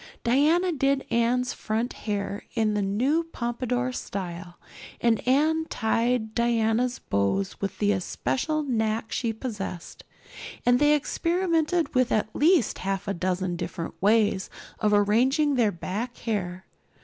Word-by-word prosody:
Diana 310 +9 +3
did 275 -2 +1
Anne's 240 +2 +1
front 225 +3 -2
hair 205 0 -4
in 220 -2 +2
the 210 - 0
new 250 +12 +1
pompadour 250 -3 -2
style 180 -6 -6 0.4
and 230 -2 +2
Anne 310 +5 +3
tied 230 0 0
Diana's 235 +1 +1
bows 100 - -1
with 195 - -3
the 205 -1 +2
especial 185 - -1
knack 225 -4 -1
she 230 -2 -1
possessed; 210 -6 -6 0.6
and 245 0 +4
they 295 0 +5
experimented 335 +2 0
with 255 -1 +2
at 215 0 0
least 320 - +3
half 195 +2 -3
a 200 - 0
dozen 185 0 -1
different 165 -1 -5
ways 205 -2 +2 0.3
of 210 -1 +2
arranging 245 +9 +3
their 235 -5 +3
back 210 +8 -5
hair. 190 -5 -3
230 Hz, 130 wpm, -26 LUFS, 200-260 Hz, 0.6 s, they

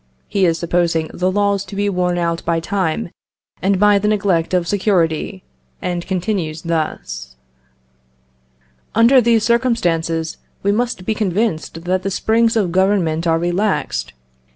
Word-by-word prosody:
(He 195 -3 +2
is 165 -1 +1
supposing 170 -2 0
the 180 +1 0
laws 200 0 +1
to 195 - -9
be 205 +1 0
worn 180 -2 0
out 170 -1 -1
by 165 0 0
time 170 -1 -2 0.5
and 195 0 +1
by 205 0 +5
the 210 - -1
neglect 195 -6 +1
of 180 -2 +1
security, 185 -2 0 0.4
and 175 -1 -3
continues 180 -4 -2
thus): 155 - -3 1.6
"Under 235 +4 +6
these 230 -2 +3
circumstances, 175 -10 0 0.3
we 200 - +2
must 230 -3 -1
be 220 - +1
convinced 190 -5 -1
that 185 +1 0
the 195 - -2
springs 225 +4 +2
of 200 -6 +1
Government 180 -3 +1
are 165 0 +3
relaxed. 175 - -1
185 Hz, 140 wpm, -18 LUFS, 165-205 Hz, 1.6 s, Under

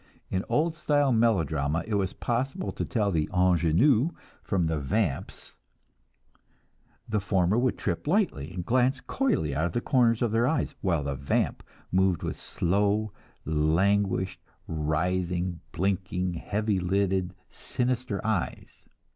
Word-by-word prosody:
In 95 0 0
old 160 +2 +1
style 145 -4 +2
melodrama 80 - +1
it 110 - -4
was 100 -2 0
possible 135 +10 -2
to - - -4
tell 105 -6 0
the 80 -4 0
"ingenue" 90 - +3 0.3
from 95 -4 0
the 80 -1 0
"vamps"; 85 +1 -2 1.5
the 110 -1 0
former 95 -1 +1
would 125 +1 +1
trip - - -3
lightly, 155 - +1
and 90 -1 -5
glance 130 +2 +2
coyly 215 - 0
out 80 +5 +1
of - - -7
the 120 - +1
corners 120 -2 +2
of 115 - +1
her 115 +2 +2
eyes, 145 0 0
while 85 -6 +1
the 70 0 -2
"vamp" 70 +1 -1 0.3
moved 95 -2 +2
with - - -4
slow, 100 +3 0 0.3
languished 90 +4 +1 0.3
writhing, 85 +3 -1
blinking 95 0 -1
heavy 105 +3 -1
lidded, 95 0 0 0.2
sinister 125 -4 -2
eyes. 110 -5 -3
95 Hz, 130 wpm, -27 LUFS, 85-115 Hz, 1.5 s, ingenue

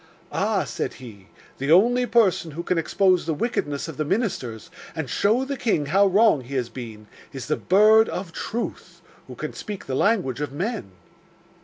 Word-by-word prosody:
"Ah," - - 0
said - - -4
he, 105 -6 -12 0.3
"the 135 +3 -1
only 245 +8 +5
person 215 -7 +2
who 165 +3 -6
can 180 -1 0
expose 185 +1 +2
the 160 - 0
wickedness 145 -7 -2
of 160 -4 -8
the 155 - 0
ministers 150 - -2 0.2
and 160 -4 -3
show 220 - +1
the 280 +1 -3
king 215 - 0
how 195 +7 +4
wrong 200 -5 +4
he 130 +3 -8
has 125 -3 -1
been, 110 -4 -9 0.3
is 135 -2 -6
the 155 - 0
Bird 215 +4 +5
of 180 -2 -5
Truth, 235 +2 -5 0.2
who - - -9
can - - -5
speak 210 -3 -7
the 135 - -4
language 175 - +1
of 150 - -3
men." 170 - -3
170 Hz, 180 wpm, -24 LUFS, 135-215 Hz, 0.3 s, only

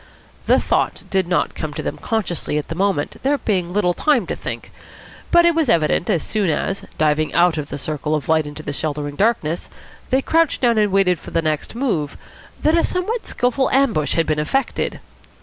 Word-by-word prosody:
The - - +5
thought - - 0
did 190 -2 +1
not 180 - 0
come 150 -2 -5
to - - -4
them - - -4
consciously 185 -9 -2
at 150 - -3
the - - -2
moment, 190 -4 -1
there 285 +2 +2
being 185 -8 -1
little 180 -2 +2
time 265 - +2
to - - -3
think, - - -6 0.6
but 345 0 +5
it 340 - +5
was 320 -5 +1
evident 165 +1 +2
as 175 -7 +1
soon 205 -5 0
as, 195 +5 -1
diving 155 0 +1
out 170 -2 +4
of 145 - -5
the 145 - -4
circle 150 +1 -2
of 150 - -3
light 160 -1 +2
into 145 +1 -8
the 145 - -4
sheltering 145 -1 -3
darkness, 180 -5 0 0.4
they 265 +1 +2
crouched 330 -2 +2
down 235 -3 +3
and 210 -2 +2
waited 185 -3 +3
for - - -10
the 165 - 0
next 155 +5 -2
move, 205 - -1 0.5
that 310 - +4
a 335 - +3
somewhat 420 +6 -2
skilful 250 +2 0
ambush 240 - +2
had 165 - +2
been 155 -1 0
effected. 260 - -1
180 Hz, 200 wpm, -20 LUFS, 155-245 Hz, 0.6 s, The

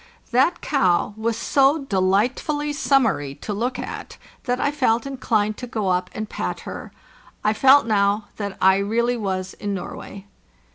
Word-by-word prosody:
That 260 +8 +2
cow 200 - +1
was 225 +1 -2
so 275 +4 +2
delight 200 +2 +1
fully 295 -1 -2
summery 225 - +1
to 210 - -5
look 245 +5 -2
at - - -7 0.3
that 250 -1 0
I 285 - +1
felt 250 -5 +1
inclined 220 -6 -1
to 250 - -6
go 215 -5 -2
up 180 0 0
and 215 0 -4
pat - - -4
her; - - -8 0.5
I 215 - +3
felt 265 +4 +6
now 205 -1 +1
that 200 -2 -4
I 190 0 +5
really 235 +5 0
was 190 -4 -3
in 205 -1 -4
Norway. 195 +1 -8
220 Hz, 160 wpm, -22 LUFS, 200-260 Hz, 0.5 s, felt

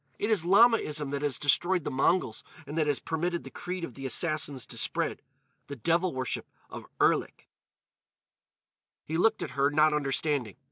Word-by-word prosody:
It 210 - -1
is 200 -7 +3
Lamaism 175 - +3
that 140 0 -3
has 145 -4 0
destroyed 175 +4 +2
the - - -3
Mongols 135 -2 +1 0.2
and 145 +2 -7
that 155 -2 +1
has 145 -2 +1
permitted 170 +2 -2
the - - -10
creed 180 0 -6
of 150 - -5
the 135 +3 -6
Assassins 145 -1 -1
to - - -8
spread—the 140 - -4
devil 170 +8 +1
worship 130 -2 -3 0.2
of - - -9
Erlik." - - +1 1.6
He 160 - -4
looked 220 +5 +2
at - - -6
her, 140 0 +2
not 155 +1 +3
understanding. 140 -5 -1
150 Hz, 160 wpm, -28 LUFS, 140-175 Hz, 1.6 s, is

